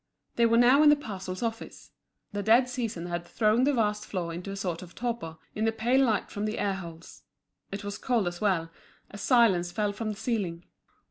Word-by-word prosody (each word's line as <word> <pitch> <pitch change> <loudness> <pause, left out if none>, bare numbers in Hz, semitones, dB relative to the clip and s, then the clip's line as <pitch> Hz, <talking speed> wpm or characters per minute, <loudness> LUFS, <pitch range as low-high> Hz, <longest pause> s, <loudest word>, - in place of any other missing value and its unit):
They 235 -1 +4
were 230 0 +3
now 250 +4 +6
in 305 - +7
the 295 - +7
parcels 190 -7 -6
office. 225 -1 -5 0.4
The 205 - -3
dead 230 +5 +5
season 230 -9 -4
had 175 -1 -3
thrown 220 +6 +2
the 290 - +3
vast 210 -2 0
floor 175 -5 -4
into 175 +4 -6
a 195 - -4
sort 180 -4 -3
of 175 -2 -12
torpor, 230 -10 -4 0.2
in 215 - -1
the 225 - +3
pale 240 +4 +2
light 225 -5 0
from 205 +1 -3
the 215 +1 -2
air 200 -1 0
holes. 170 -3 -9 0.5
It 200 +1 -5
was 205 0 -5
cold 235 -7 +1
as 175 0 -5
well, 175 -6 +1 0.4
a 200 - -9
silence 195 -7 +3
fell 210 +1 0
from 215 +2 -4
the 210 - -5
ceiling. 200 -8 -2
210 Hz, 210 wpm, -28 LUFS, 180-235 Hz, 0.5 s, in